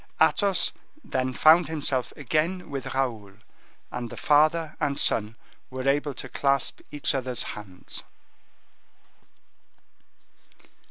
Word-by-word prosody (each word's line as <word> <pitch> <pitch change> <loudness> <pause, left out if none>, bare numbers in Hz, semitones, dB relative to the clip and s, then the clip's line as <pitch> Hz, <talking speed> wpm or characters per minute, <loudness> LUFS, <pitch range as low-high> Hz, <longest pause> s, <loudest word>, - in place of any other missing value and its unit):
Athos 195 -4 +3 0.3
then 130 -1 -1
found 160 +6 +5
himself 140 -5 -1
again 155 +5 -1
with 135 -1 -5
Raoul, 115 -7 -2 0.6
and 120 -1 -5
the - - -9
father 155 +2 +3
and 140 -1 0
son 110 +1 +3 0.3
were 130 +1 -4
able 145 0 +1
to - - -6
clasp 140 -2 0
each 145 - 0
other's 130 -4 0
hands. 95 -4 -8
140 Hz, 105 wpm, -26 LUFS, 125-155 Hz, 0.6 s, found